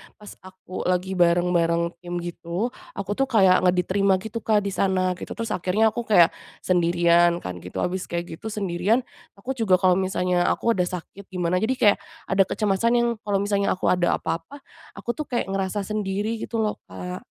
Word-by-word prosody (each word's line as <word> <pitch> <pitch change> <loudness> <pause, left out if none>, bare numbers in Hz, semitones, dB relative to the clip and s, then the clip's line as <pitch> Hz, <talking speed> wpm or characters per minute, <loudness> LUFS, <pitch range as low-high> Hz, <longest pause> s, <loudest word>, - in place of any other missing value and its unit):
pas 210 -1 -12
aku 185 -1 -7
lagi 185 +1 0
bareng-bareng 170 -1 +2
tim 175 0 -6
gitu, 175 +6 -3 0.2
aku 195 0 -4
tuh 270 +6 0
kayak 190 -6 +5
enggak 180 0 +3
diterima 195 +1 +2
gitu 225 +1 -5
Kak, 210 -2 +1
di 200 - -2
sana 185 -1 +1
gitu. - - -7
Terus 230 0 -4
akhirnya 200 +5 +2
aku 235 +1 -5
kayak 175 -6 +6 0.3
sendirian 175 -1 +3
kan 90 -1 -5
gitu, 90 +2 -5
habis 185 +1 -2
kayak 170 -1 -5
gitu, - - -7
sendirian, 205 +3 0 0.3
aku 220 +7 -6
juga 225 -8 +2
kalau 185 0 +3
misalnya 180 -1 +1
aku 230 - +1
ada 180 -5 +1
sakit 185 +2 -8
gimana, 180 -1 -1
jadi 240 +6 0
kayak 210 -5 +4 0.3
ada 195 0 +5
kecemasan 210 +2 +1
yang - - +2
kalau 205 -1 -2
misalnya 200 -1 +1
aku 185 - +1
ada 175 -1 +2
apa-apa, 165 - -5 0.3
aku 240 - -3
tuh 305 +2 -6
kayak 240 -6 -2
ngerasa 195 +1 -1
sendiri 210 +2 -2
gitu 230 - -6
loh 210 - -2
Kak. 180 0 -6
190 Hz, 185 wpm, -24 LUFS, 175-210 Hz, 0.3 s, kayak